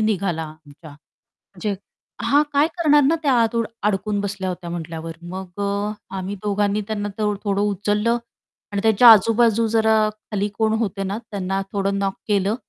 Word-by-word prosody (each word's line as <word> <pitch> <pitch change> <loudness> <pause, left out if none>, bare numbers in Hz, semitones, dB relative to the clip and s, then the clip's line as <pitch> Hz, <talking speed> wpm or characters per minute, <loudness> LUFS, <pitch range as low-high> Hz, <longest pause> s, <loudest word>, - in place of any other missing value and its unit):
निघाला 195 -6 0
आमच्या 155 0 -13 0.5
म्हणजे 200 +2 -5 0.5
हां, 290 +1 +4
काय 290 +3 +4
करणार 295 -3 +5
ना, 310 +5 +3
त्या 280 -3 +3
आत 230 - +4
अडून 230 0 -1 0.2
अडकून 205 0 0
बसल्या 195 -2 -3
होत्या 175 -1 -6
म्हटल्यावर 165 -1 -6 0.2
मग 190 0 -7
अ, 200 +1 -1 0.3
आम्ही 190 +2 -4
दोघांनी 205 0 0
त्यांना 205 -2 -3
थो 210 -1 +1
थोडं 200 -1 0
उचललं 210 +3 +1 0.6
आणि 200 - 0
त्याच्या 220 +2 +5
आजूबाजू 225 +1 +4
जरा 220 0 +3
खाली 210 -1 -4
कोण 220 -1 +2
होते 200 -3 -2
ना, 195 +2 -3
त्यांना 195 -1 -2
थोडं 200 0 0
नॉक 195 -1 0
केलं 205 0 +1
205 Hz, 160 wpm, -22 LUFS, 195-220 Hz, 0.6 s, करणार